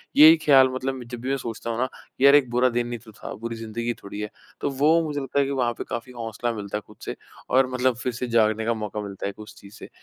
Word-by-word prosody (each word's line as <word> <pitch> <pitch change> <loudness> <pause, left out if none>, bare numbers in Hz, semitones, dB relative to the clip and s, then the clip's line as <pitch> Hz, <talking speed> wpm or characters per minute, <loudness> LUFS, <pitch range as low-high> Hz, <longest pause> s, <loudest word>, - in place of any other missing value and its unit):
यही 160 +2 +9
ख्याल 135 -3 +7
मतलब 130 -1 -3
जब 120 0 -8
भी 130 - -3
मैं 135 - +1
सोचता 115 -2 -5
हूँ 115 - -2
ना 130 - +1 0.3
यार 140 +1 +8
एक 140 -4 +4
बुरा 125 +1 +3
दिन 120 0 -1
नहीं 120 -1 -5
तो 110 - -12
था - - -8
बुरी 115 0 -3
ज़िंदगी 115 +1 -3
थोड़ी 100 +1 -7
है, 105 - -4 0.3
तो - - 0
वो 150 +5 +3
मुझे 150 -2 -2
लगता 135 +1 -1
है 140 - +3
कि 140 - -3
वहाँ 125 -3 0
पे - - -4
काफ़ी 120 +1 -5
हौसला 115 +1 -3
मिलता 105 -1 -4
है 105 - -6
ख़ुद - - -16
से - - -4 0.3
और 130 0 +4
मतलब 125 -1 +2
फ़िर 125 0 -3
से 125 +2 -4
जागने 110 -1 +2
का 115 - +2
मौका 105 -1 -4
मिलता 100 -1 -5
है 100 - -4
उस 105 0 -11
चीज़ 100 0 -14
से। - - -11
120 Hz, 275 wpm, -24 LUFS, 110-130 Hz, 0.3 s, यही